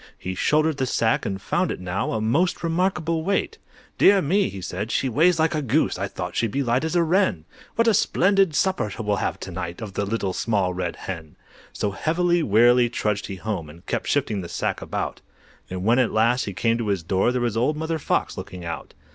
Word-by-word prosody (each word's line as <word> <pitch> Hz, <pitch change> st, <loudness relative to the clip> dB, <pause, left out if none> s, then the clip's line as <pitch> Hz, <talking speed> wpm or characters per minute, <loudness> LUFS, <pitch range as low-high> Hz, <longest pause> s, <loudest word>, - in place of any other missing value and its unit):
He 95 Hz, -, -5 dB
shouldered 155 Hz, -, +2 dB
the 130 Hz, -1 st, 0 dB
sack, 115 Hz, -1 st, +1 dB
and 95 Hz, -1 st, -3 dB
found -, -, 0 dB
it -, -, -4 dB
now 90 Hz, +1 st, -2 dB
A 110 Hz, -, 0 dB
most 145 Hz, +15 st, +1 dB
remarkable 165 Hz, -1 st, 0 dB
weight. 195 Hz, +3 st, -1 dB, 0.4 s
"Dear 200 Hz, 0 st, +6 dB
me!" 190 Hz, +5 st, +2 dB
he 100 Hz, -, -7 dB
said, 95 Hz, +4 st, -4 dB
"she 135 Hz, -, 0 dB
weighs 160 Hz, +8 st, +3 dB
like 160 Hz, 0 st, +2 dB
a 155 Hz, -, 0 dB
goose! 135 Hz, -6 st, +1 dB
I 100 Hz, -, -1 dB
thought 90 Hz, -2 st, -6 dB
she'd 115 Hz, -, +1 dB
be 140 Hz, +6 st, -1 dB
light 120 Hz, +2 st, +1 dB
as 160 Hz, +2 st, -2 dB
a 170 Hz, -, +4 dB
wren; 165 Hz, -, +1 dB, 0.3 s
What 230 Hz, 0 st, +2 dB
a 225 Hz, -, +5 dB
splendid 195 Hz, -4 st, +3 dB
supper 185 Hz, -, +1 dB
we'll 105 Hz, -2 st, 0 dB
have -, -, -2 dB
to -, -, -6 dB
night 85 Hz, +1 st, -5 dB
Off 110 Hz, -4 st, -7 dB
the 100 Hz, -, -1 dB
Little 100 Hz, -2 st, -2 dB
Small 100 Hz, -5 st, 0 dB
Red 90 Hz, -, -3 dB
Hen!" 85 Hz, -5 st, -7 dB, 0.4 s
So 105 Hz, -, -2 dB
heavily, 170 Hz, -, +1 dB
wearily 120 Hz, 0 st, +4 dB
trudged 105 Hz, -3 st, -1 dB
he 95 Hz, -, -5 dB
home, 95 Hz, -5 st, -4 dB
And 85 Hz, +3 st, -15 dB
kept -, -, -2 dB
shifting 105 Hz, -3 st, 0 dB
the 85 Hz, -, -7 dB
sack -, -, -2 dB
about; -, -, -4 dB, 0.5 s
And 90 Hz, 0 st, -4 dB
when 120 Hz, +3 st, +4 dB
at 125 Hz, -, +2 dB
last 115 Hz, +3 st, +2 dB
he 100 Hz, -, -5 dB
came 115 Hz, +4 st, +1 dB
to 115 Hz, -, -2 dB
his 100 Hz, -4 st, 0 dB
door, 95 Hz, +7 st, +1 dB
There 125 Hz, -, -1 dB
was 120 Hz, -3 st, 0 dB
old 125 Hz, +7 st, +1 dB
Mother 160 Hz, +1 st, -2 dB
Fox -, -, -1 dB
looking 90 Hz, -2 st, -7 dB
out. 85 Hz, -1 st, -6 dB
115 Hz, 220 wpm, -24 LUFS, 100-160 Hz, 0.5 s, Dear